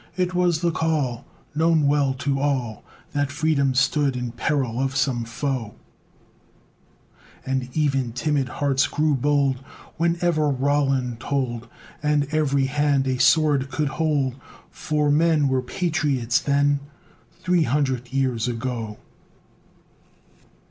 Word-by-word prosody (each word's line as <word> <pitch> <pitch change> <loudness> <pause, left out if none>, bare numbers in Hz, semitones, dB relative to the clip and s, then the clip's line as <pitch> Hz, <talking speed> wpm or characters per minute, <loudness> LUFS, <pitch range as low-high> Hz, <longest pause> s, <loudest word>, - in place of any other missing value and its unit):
It 180 0 -1
was 175 -3 +1
the 170 -1 +2
call 155 -7 -1 0.3
Known 160 0 +3
well 140 -2 +2
to 140 0 -1
all, 130 -6 -1 0.3
That 145 -1 0
Freedom 140 -3 +1
stood 140 0 +2
in 125 -1 -3
peril 125 -1 -1
of 135 0 -1
some 130 -3 0
foe: 120 -2 -3 1.7
And 130 -1 -2
even 135 -5 +1
timid 135 +2 -1
hearts 135 +1 +1
grew 155 0 +1
bold 140 0 +1 0.4
Whenever 170 -2 +1
Roland 135 -3 0
tolled, 120 -3 -2 0.3
And 150 -1 +2
every 140 -3 +1
hand 140 0 +1
a 130 -1 -1
sword 140 0 +3
could 150 0 -1
hold; 145 -3 0 0.4
For 150 -1 0
men 155 -1 +3
Were 130 -1 +1
patriots 140 -4 0
then, 145 0 +2 0.6
Three 180 -2 +1
hundred 130 -2 -1
years 130 -4 0
ago! 115 -3 -4
140 Hz, 120 wpm, -23 LUFS, 130-150 Hz, 1.7 s, Known